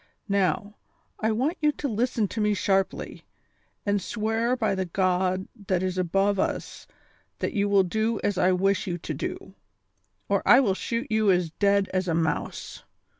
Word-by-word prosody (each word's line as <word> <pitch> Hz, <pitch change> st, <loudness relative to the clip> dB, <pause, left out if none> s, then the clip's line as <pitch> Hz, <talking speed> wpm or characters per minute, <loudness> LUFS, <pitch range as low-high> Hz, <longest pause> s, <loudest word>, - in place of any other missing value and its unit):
Now, 200 Hz, +2 st, 0 dB, 0.5 s
I 220 Hz, +1 st, +1 dB
want 270 Hz, +11 st, -1 dB
you 300 Hz, -1 st, +4 dB
to 285 Hz, -, -3 dB
listen 230 Hz, -2 st, 0 dB
to 220 Hz, -, -3 dB
me 210 Hz, 0 st, +2 dB
sharply, 195 Hz, -1 st, -1 dB, 0.6 s
and 205 Hz, -1 st, +1 dB
swear 225 Hz, +4 st, 0 dB
by 220 Hz, -5 st, 0 dB
the 190 Hz, -1 st, -1 dB
God 185 Hz, +1 st, 0 dB, 0.2 s
that 185 Hz, -1 st, +1 dB
is 185 Hz, -1 st, -1 dB
above 195 Hz, +2 st, +1 dB
us -, -, -3 dB, 0.5 s
that -, -, -2 dB
you 205 Hz, -3 st, +1 dB
will 200 Hz, -1 st, +5 dB
do 220 Hz, +4 st, -1 dB
as 205 Hz, -, +1 dB
I 185 Hz, -, +3 dB
wish 195 Hz, +2 st, +1 dB
you 175 Hz, -1 st, -2 dB
to 175 Hz, -, -5 dB
do, -, -, -5 dB, 0.7 s
or -, -, +1 dB
I 245 Hz, -, +7 dB
will 220 Hz, -8 st, +2 dB
shoot 230 Hz, +6 st, -3 dB
you 215 Hz, -1 st, +3 dB
as 180 Hz, -3 st, +2 dB
dead 200 Hz, +2 st, +2 dB
as 185 Hz, 0 st, 0 dB
a 165 Hz, -, +1 dB
mouse. 160 Hz, -1 st, -2 dB
200 Hz, 175 wpm, -26 LUFS, 185-220 Hz, 0.7 s, I